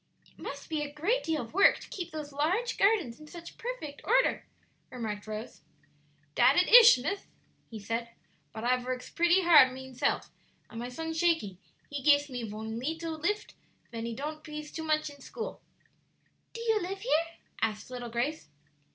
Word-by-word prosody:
"It - - -25
must - - -7
be 310 -2 -2
a 290 -1 -4
great 370 +13 0
deal 315 -4 -1
of 230 - -12
work 395 +3 +6
to - - -12
keep 355 -3 -5
those 300 -3 -7
large 365 +12 0
gardens 390 - +2
in 305 - -13
such 340 +2 -11
perfect 465 - -6
order," - - +2 0.4
remarked 220 -5 -5
Rose. 215 +2 -7 0.7
"Dat 250 - +5
it 360 - +4
ish, 475 - +9
miss," 390 +11 -3 0.4
he 225 - -7
said; 230 +3 -3 0.4
"but 220 - -7
I 250 +1 +3
vorks 250 0 -5
pretty 345 +2 +4
hard 300 -7 +8
mineself, 260 -1 -2 0.4
and 225 - -7
my 240 +1 -4
son 320 +5 -4
Shakey, 320 - +1 0.3
he 285 -1 -5
gifs 285 0 +4
me 245 -1 -4
von 220 +1 -5
leetle 320 +4 -4
lift 415 +6 -2 0.4
ven 230 0 -4
he 230 - -4
ton't 305 +4 -5
pees 300 -1 -7
too 320 - -5
much 310 -1 +1
in 285 -1 -16
school." 450 - -7 0.9
"Do 460 - -7
you 445 -2 +1
live 385 +2 -4
here?" 335 -8 +2 0.4
asked 215 +2 -2
little 245 -1 -5
Grace. 240 - -2
300 Hz, 175 wpm, -30 LUFS, 245-345 Hz, 0.9 s, ish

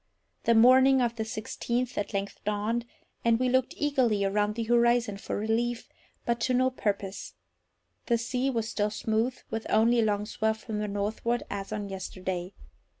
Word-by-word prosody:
The 230 - +4
morning 260 +3 +7
of 240 -2 +1
the 220 - -2
sixteenth 235 +2 -3
at 205 -1 -2
length 200 -1 -4
dawned, 215 +3 -1 0.4
and 230 0 +3
we 255 0 +2
looked 260 0 +1
eagerly 250 -9 +2
around 205 +1 +1
the 230 - -2
horizon 235 -2 +3
for - - -4
relief, 230 +3 -1 0.4
but 235 0 0
to 250 +2 +1
no 255 +1 +3
purpose. 200 - -3 0.7
The 235 - +3
sea 250 +3 -1
was 230 -4 -1
still 210 -3 0
smooth, 225 +4 -1
with 225 0 -3
only 230 +3 +4
a - - +4
long 210 -1 0
swell 220 0 0
from 215 -1 -5
the 210 - -2
northward, 210 +4 -1
as 195 0 -5
on 210 -1 -3
yesterday. 185 -1 -5
225 Hz, 170 wpm, -28 LUFS, 205-240 Hz, 0.7 s, morning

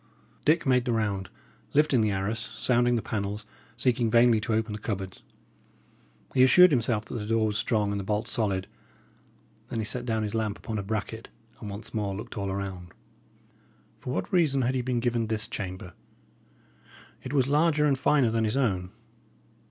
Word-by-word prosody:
Dick 155 +3 +3
made 125 -2 +3
the 120 - 0
round, 100 -4 -1 0.5
lifting 145 -5 +4
the 110 - +2
arras, 100 +3 -1 0.2
sounding 120 -1 +2
the 115 - -1
panels, 105 0 -3 0.3
seeking 120 -1 +1
vainly 115 -1 +5
to 115 - -3
open 110 0 0
the 105 - -5
cupboards. 95 -3 -5 1.1
He 130 - +3
assured 180 +7 +7
himself 115 -5 +1
that - - -9
the 105 - -5
door 115 0 +2
was 105 -1 0
strong 105 -3 +1
and 100 - -2
the - - -4
bolt 105 +2 -1
solid; 100 -4 0 1.0
then 120 - -4
he 110 - -1
set 120 +3 -2
down 110 -2 -1
his 105 0 -3
lamp 110 -2 -1
upon 110 -2 -4
a - - -1
bracket, 110 +2 -4 0.3
and 105 - -7
once 100 +3 -8
more 105 -3 -2
looked 105 - -8
all 100 -2 -3
around. 95 -2 -5 1.1
For 125 - -5
what - - -3
reason 145 -7 +3
had 125 +2 +1
he 130 - 0
been 125 -1 -1
given 120 -2 0
this 110 0 0
chamber? 90 -4 -6 1.3
It 130 - -7
was 135 -3 +2
larger 150 +1 +3
and 145 -2 +3
finer 135 -2 +3
than 115 0 +1
his 110 +4 0
own. 95 -9 0
110 Hz, 185 wpm, -27 LUFS, 105-125 Hz, 1.3 s, assured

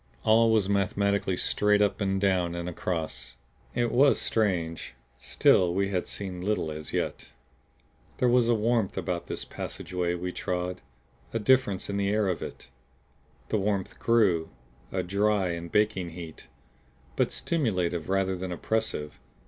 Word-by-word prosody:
All 115 +1 +5
was 110 -4 +3
mathematically 100 -1 +1
straight 105 +2 +2
up 105 0 +1
and 95 -1 +1
down 90 -3 +1
and 85 0 -4
across. 80 -7 -4 0.4
It 120 -1 +1
was 135 +3 +5
strange 85 - -1 0.2
still 90 +7 +3
we 100 0 +1
had 90 -2 -1
seen 95 -3 -5
little 95 -5 -1
as 75 0 -6
yet. - - -2 0.9
There 125 - +2
was 120 -1 +4
a 120 - +4
warmth 110 -2 +1
about 90 -2 -2
this - - -4
passageway 90 -1 -3
we 90 +1 -3
trod; 90 0 -3 0.5
a - - +1
difference 110 -4 +2
in 100 - -2
the 100 0 +1
air 105 0 +2
of 90 - -2
it. - - -8 0.8
The 110 - +1
warmth 100 -1 -2
grew, 100 -9 +3 0.4
a - - -1
dry 100 0 +1
and 85 0 -5
baking 95 -4 +1
heat; 80 -2 -10 0.7
but - - +1
stimulative 90 - -1
rather 95 -1 +1
than 90 0 -5
oppressive. 90 -6 -2
95 Hz, 150 wpm, -28 LUFS, 90-105 Hz, 0.9 s, All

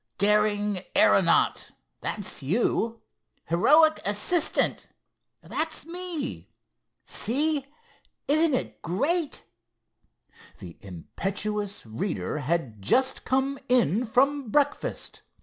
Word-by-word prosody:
'Daring 210 -1 +2 0.2
aeronaut'—that's 200 -6 +1
you. 225 - 0 0.5
'Heroic 305 - +5
assistant'—that's 315 - -2
me. 340 -4 -5 0.6
See, 285 +4 -1 0.6
isn't 310 0 +4
it - - -4
great!" 285 - -1 1.1
The 85 -2 -10
impetuous 200 - -4
speaker 150 - -4
had 135 -7 -2
just 260 - +1
come 270 +1 0
in 240 - +2
from 270 +2 +1
breakfast. 290 +4 -1
230 Hz, 75 wpm, -26 LUFS, 195-285 Hz, 1.1 s, Heroic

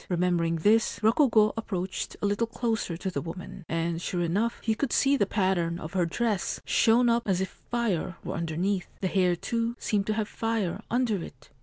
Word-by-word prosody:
Remembering 175 -2 +1
this, 210 +8 +3
Rokugo 220 -2 +4
ap 225 - -5
proached 185 -2 -3
a - - +3
little 205 +3 +1
closer 225 -7 -2
to 190 +2 -3
the 140 - -2
woman; 175 +2 -8
and, 165 0 -1
sure 175 -1 -1
enough, 205 +8 0
he 220 - +2
could 250 +4 -2
see 275 +1 +4
the 205 -8 +2
pattern 185 -5 +1
of 160 +1 -7
her 180 -3 +2
dress, 215 +2 -1
shown 235 +2 +4
up 235 0 +2
as 190 -2 +2
if 190 - -1 0.2
fire 215 -8 -1
were - - -4
underneath. 175 +4 -1
The 190 - +1
hair, 180 -2 +2
too, 230 +5 -2
seemed 205 -2 -1
to 215 - +1
have 215 -2 -1
fire 220 -5 -2
under 230 -7 +1
it. 135 +2 -13
195 Hz, 195 wpm, -28 LUFS, 175-225 Hz, 0.2 s, Rokugo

